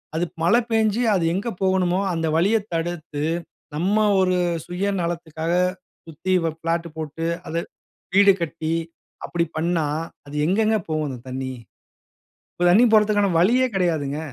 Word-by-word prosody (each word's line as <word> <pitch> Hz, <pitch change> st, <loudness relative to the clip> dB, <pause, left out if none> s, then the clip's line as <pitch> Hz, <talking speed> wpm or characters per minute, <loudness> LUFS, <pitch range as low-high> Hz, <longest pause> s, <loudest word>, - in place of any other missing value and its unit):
அது 170 Hz, +2 st, +1 dB, 0.2 s
மழை 220 Hz, +8 st, +5 dB
பெய்ஞ்சு 220 Hz, 0 st, +2 dB
அது 180 Hz, -, +1 dB
எங்கு 200 Hz, +6 st, -2 dB
போகணுமோ? 185 Hz, -1 st, +2 dB
அந்த 165 Hz, -1 st, -1 dB
வழிய 200 Hz, +7 st, +3 dB, 0.2 s
தடுத்து, 165 Hz, -3 st, -3 dB, 0.5 s
நம்ம 185 Hz, +7 st, +1 dB, 0.2 s
ஒரு 185 Hz, -1 st, +2 dB, 0.3 s
சுயநலத்துக்காக 170 Hz, -3 st, -2 dB, 0.5 s
சுத்தி 165 Hz, +4 st, -3 dB
வ -, -, +1 dB
பிளாட் 165 Hz, +1 st, -1 dB
போட்டு 160 Hz, +1 st, -4 dB, 0.2 s
அது 165 Hz, -, -1 dB, 0.6 s
வீடு 200 Hz, 0 st, +7 dB
கட்டி 160 Hz, -1 st, -3 dB, 0.5 s
அப்படி 170 Hz, -1 st, 0 dB
பண்ணா, 165 Hz, -1 st, 0 dB, 0.4 s
அது 145 Hz, +1 st, -7 dB
எங்கங்க 215 Hz, +5 st, +2 dB
போவும் 155 Hz, -1 st, -1 dB
அந்த 130 Hz, -3 st, -6 dB
தண்ணி? 130 Hz, 0 st, -4 dB, 1.0 s
இப்ப 175 Hz, -, -2 dB
தண்ணி 210 Hz, +7 st, +6 dB
போறதுக்கான 210 Hz, -2 st, +4 dB
வழியே 240 Hz, +9 st, +4 dB
கிடையாதுங்க. 155 Hz, -6 st, 0 dB
175 Hz, 130 wpm, -23 LUFS, 160-195 Hz, 1.0 s, வீடு